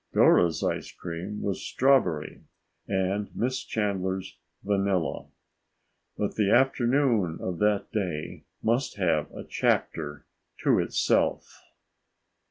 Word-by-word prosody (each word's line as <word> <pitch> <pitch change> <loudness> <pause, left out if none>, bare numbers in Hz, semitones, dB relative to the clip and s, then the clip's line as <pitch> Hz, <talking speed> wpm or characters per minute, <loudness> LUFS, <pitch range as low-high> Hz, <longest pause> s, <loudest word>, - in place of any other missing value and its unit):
Dora's 85 -2 +4
ice - - -2
cream 90 +4 -6
was 100 -2 -2
strawberry 130 - +1 0.4
and 95 +1 -1
Miss 130 +2 -1
Chandler's 95 -3 -2 0.3
vanilla. 100 -4 0 0.9
But 105 - -1
the 105 -2 +2
afternoon 120 - +3
of 90 -2 -4
that 105 -1 +1
day 90 -8 -3 0.2
must 120 +4 0
have - - +1
a - - -8
chapter 75 -3 -1 0.4
to - - +4
itself. - - +1
100 Hz, 100 wpm, -27 LUFS, 90-115 Hz, 0.9 s, Dora's